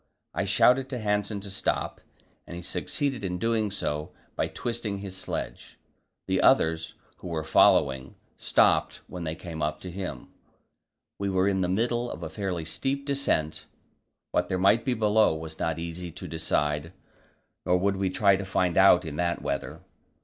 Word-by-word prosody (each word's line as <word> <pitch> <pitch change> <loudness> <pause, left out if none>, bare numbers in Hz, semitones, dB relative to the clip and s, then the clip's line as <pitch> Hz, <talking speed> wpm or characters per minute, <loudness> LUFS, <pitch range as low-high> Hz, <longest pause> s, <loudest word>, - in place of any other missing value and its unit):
I - - -1
shouted 130 +1 +4
to 125 - -3
Hanssen 105 -1 -1
to 100 0 -6
stop, 95 - -1 0.5
and 85 - -7
he 85 - -7
succeeded 135 +5 -2
in 90 -2 -2
doing 110 +1 +1
so 75 -6 -3 0.2
by - - 0
twisting 115 -4 -3
his 100 -1 -7
sledge. 95 - -5 0.5
The - - +1
others, 80 0 +3 0.2
who - - -9
were 80 -2 -2
following, 65 -3 +3 0.2
stopped - - +2
when 90 -2 -7
they 80 0 -3
came 85 -2 -7
up 75 0 -1
to 90 - -7
him. 90 -8 -6 0.9
We 100 0 -1
were 95 0 +2
in 95 -1 +1
the 90 - 0
middle 120 +5 0
of - - -7
a - - -5
fairly 95 -5 -3
steep 135 - -2
descent; 140 - -1 0.6
what 90 - 0
there 95 - 0
might 100 +5 +4
be 125 - +1
below 110 -4 +3
was 80 0 -8
not 80 -1 -1
easy 85 +1 -5
to - - -8
decide, 75 0 -1 0.7
nor 90 - +3
would 100 +1 +1
we 95 -1 0
try 100 +1 +4
to 100 - -4
find 90 -2 0
out 95 -2 +6
in 75 -2 -5
that 85 0 -1
weather. 70 0 -3
95 Hz, 170 wpm, -27 LUFS, 80-105 Hz, 0.9 s, out